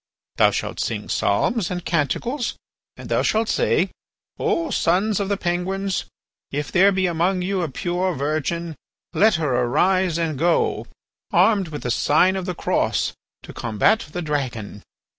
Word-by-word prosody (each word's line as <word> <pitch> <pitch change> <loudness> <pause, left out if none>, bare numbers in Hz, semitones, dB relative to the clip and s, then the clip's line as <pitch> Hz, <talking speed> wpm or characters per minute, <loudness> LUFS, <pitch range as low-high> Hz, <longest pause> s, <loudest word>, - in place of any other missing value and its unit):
"Thou - - +6
shalt - - -3
sing - - -3
psalms 230 -7 +1
and 180 -1 -4
canticles 180 - -1 0.4
and - - -9
thou - - +1
shalt 220 +1 +1
say: - - +1 0.5
"'O 330 -1 0
sons 195 +5 +1
of 200 -1 -2
the 200 - 0
Penguins, 190 +2 -2 0.4
if 145 +1 -4
there 195 +2 +5
be 190 -1 +1
among 180 +2 +1
you 190 0 -1
a 165 - -2
pure 175 +5 -1
virgin, 155 +4 -2 0.4
let 215 -1 +4
her 155 -4 0
arise 180 +7 +2
and 160 -5 -2
go, 170 +1 +1 0.4
armed 195 0 +4
with 150 -2 -7
the 125 - -1
sign 180 +10 +3
of 190 -1 -4
the 180 - -3
cross, - - 0 0.3
to - - -10
combat 120 - +1
the 175 +2 -4
dragon! 125 -9 -3
180 Hz, 155 wpm, -22 LUFS, 155-195 Hz, 0.5 s, Thou